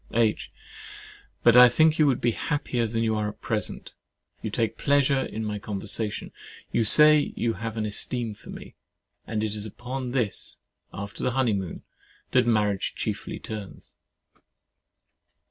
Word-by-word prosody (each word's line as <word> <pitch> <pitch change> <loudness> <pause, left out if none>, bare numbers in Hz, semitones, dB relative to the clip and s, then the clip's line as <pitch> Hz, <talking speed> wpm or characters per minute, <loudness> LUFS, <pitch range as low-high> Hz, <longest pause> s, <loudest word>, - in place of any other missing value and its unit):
H. 115 -2 +1 0.9
But 120 - +6
I 125 0 +10
think 155 +5 +3
you 155 - +5
would 130 -3 +1
be 120 - +2
happier 125 -3 -2
than 115 +1 -1
you 110 -1 +1
are 105 -1 -1
at 105 - -12
present. 110 -2 -4 0.5
You - - -3
take 115 -1 -1
pleasure 140 -1 +2
in 110 0 -5
my 105 -1 -3
conversation, 105 +1 -3
and - - -14
you 115 - +3
say 150 +6 +6
you 115 -1 0
have 110 +2 -6
an 110 - -1
esteem 115 +2 -1
for - - -15
me; - - -10 0.5
and 110 -1 -2
it 110 -1 -2
is 105 0 -3
upon 125 +4 -6
this, 120 -5 -1 0.3
after 100 +1 -7
the 125 - 0
honeymoon, 105 -8 -1 0.5
that 125 -2 +3
marriage 105 -4 +1
chiefly - - -4
turns. 105 -3 -8
115 Hz, 155 wpm, -26 LUFS, 105-125 Hz, 0.9 s, I